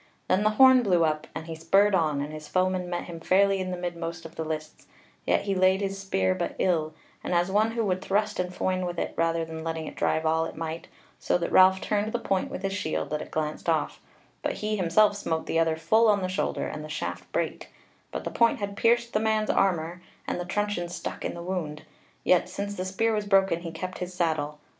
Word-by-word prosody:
Then 185 +2 +3
the 215 - +4
horn 260 -1 +8
blew 180 -7 +3
up 155 -1 -1
and 160 - -5
he 165 - -6
spurred 195 +6 +3
on, 155 -6 +2
and 150 +2 -5
his 155 -1 -8
foeman 185 0 0
met 175 -1 -2
him 170 -2 -8
fairly 195 +3 +3
in 185 0 -3
the 180 - -3
midmost 170 -1 -5
of 165 - -9
the 160 - -3
lists: 155 -1 -6 0.4
yet - - +3
he 200 - -1
laid 185 0 +3
his 195 -1 -3
spear 95 - +1
but 95 - -3
ill, 160 -4 0 0.3
and 180 - -1
as 175 +2 +2
one 215 +3 +2
who 230 -1 0
would 185 -2 0
thrust 210 +2 0
and 180 0 -1
foin 185 0 -1
with 175 -1 -4
it - - -2
rather 165 0 +1
than 160 0 -7
letting 160 -1 -3
it - - -7
drive 160 0 0
all 160 +1 +2
it - - -7
might, 165 0 -5 0.3
so - - +1
that 170 - -3
Ralph 190 +1 +6
turned 210 +1 -1
the - - +2
point 195 -5 -1
with 190 - -6
his 195 0 -1
shield 195 -8 -2
that 150 - -1
it - - -8
glanced 155 -1 -3
off, - - 0 0.4
but - - -1
he 215 0 -2
himself 205 +3 +3
smote 160 -5 -2
the 165 - 0
other 165 -1 +2
full 220 +9 +3
on 205 -2 +3
the - - 0
shoulder, 185 +1 -1
and 150 - -5
the 155 - -8
shaft 155 - -5
brake, - - -3 0.4
but - - -4
the - - -4
point 235 -1 +3
had 200 -1 -4
pierced 235 +2 +2
the 215 - +2
man's 215 -1 +1
armour, 175 -2 0 0.3
and - - -2
the 175 - -3
truncheon 205 -2 -1
stuck 175 - -6
in - - -3
the 170 - -7
wound: 170 -5 -4 0.4
yet 180 - +3
since 200 0 -4
the 185 -2 -4
spear 220 +4 0
was 210 -1 -1
broken 195 -3 +3
he 170 -1 -6
kept 185 +3 -6
his 180 0 -5
saddle. 155 -4 -1
180 Hz, 235 wpm, -27 LUFS, 165-200 Hz, 0.4 s, horn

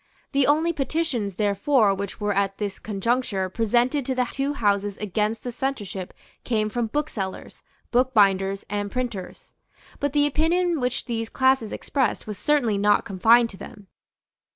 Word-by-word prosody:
The 275 -1 +3
only 315 +4 +3
petitions 270 - -2
therefore 210 +2 +2
which 195 0 -5
were 205 -1 0
at 195 0 0
this 205 -2 -4
conjuncture 210 -2 -1
presented 240 +7 +1
to 260 - 0
the 250 0 +1
two 275 +1 -1
Houses 205 -5 0
against 210 +2 -2
the 245 - -4
censorship 220 -8 -4 0.3
came 215 -3 0
from 235 +1 -1
booksellers, 220 -8 -4 0.3
bookbinders 200 -6 +2
and 205 0 -2
printers. 240 -7 -5 0.5
But 285 -1 -1
the 290 -1 +4
opinion 330 +3 +1
which 250 -1 -2
these 225 -2 -3
classes 260 -4 +2
expressed 270 -3 -1
was 210 -3 -6
certainly 245 -9 +2
not 205 0 +3
confined 230 +5 +4
to 195 - -12
them. 200 -1 -12
225 Hz, 150 wpm, -24 LUFS, 200-265 Hz, 0.5 s, the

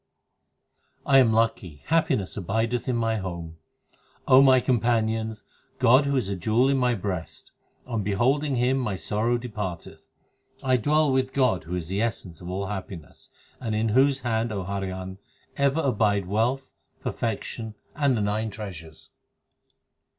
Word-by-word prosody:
7 140 - +3
I - - +9
am 120 -4 +5
lucky; 110 -9 0
x - - -18
happiness 155 - +1
abideth 110 +6 -1
in 125 - +1
my 115 -1 0
home; 85 -4 -6 0.7
my 130 0 +7
companions, 110 -3 0 0.3
God 130 +3 +5
who 140 - +1
is 125 -7 0
a 100 - -2
jewel 110 +8 +2
is - - +3
in 135 - +1
my 125 -1 +2
breast; 95 -5 -5 0.3
on 115 -4 -2
beholding 130 +9 +1
Him 125 +2 +2
my 110 -6 -2
sorrow 110 +5 0
depart 105 -7 -5
eth. - - -15 0.5
1 130 -2 +2
dwell 150 +2 +3
with 130 0 0
God 125 -11 +1
who 90 +2 -4
is 85 -3 -4
the 95 +3 -1
essence 95 -7 -3
of 90 - -7
all 95 +2 -3
happiness, 95 -4 -8 0.3
And 115 -4 -3
in 110 +1 +1
whose 135 +4 +3
hand, 115 -1 -1
O 100 -3 -3
Harihan, 95 -1 -5 0.4
ever 140 +2 +2
abide 105 - +1
wealth, 115 +8 -1 0.3
per - - -2
fection, 110 0 -4 0.2
and 140 -4 +2
the - - -1
nine 105 +2 -1
treasures. 85 -7 -9
110 Hz, 160 wpm, -25 LUFS, 100-130 Hz, 0.7 s, I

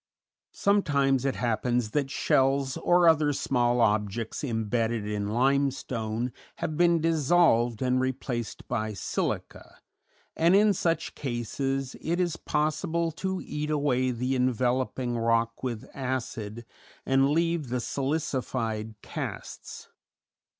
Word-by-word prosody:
_] - - -67 0.5
Sometimes 140 -10 +2
it 135 - 0
happens 120 -1 0
that 140 0 0
shells 135 0 +2
or 175 0 +4
other 155 -2 +4
small 120 -3 +1
objects 105 +3 0
imbedded 115 -2 -1
in 105 -1 -2
limestone 125 -2 0 0.2
have 155 - -3
been 170 +1 +4
dissolved 155 -7 +3
and 130 0 +2
replaced 125 -2 -3
by 110 -1 -2
silica, 100 - -4 0.6
and 170 +3 +4
in 210 +1 +5
such 165 -2 -1
cases 135 +1 -3
it 170 +2 -1
is 175 -2 +1
possible 165 +2 -1
to 190 +3 -3
eat 150 0 -3
away 140 -4 +1
the 125 +2 -1
enveloping 125 0 0
rock 115 0 +1
with 120 -4 -4
acid 120 -4 -4 0.4
and 135 +1 +3
leave 165 -2 +1
the 125 +1 -1
silicified 130 -6 -2
casts. - - -7
130 Hz, 115 wpm, -27 LUFS, 120-150 Hz, 0.6 s, in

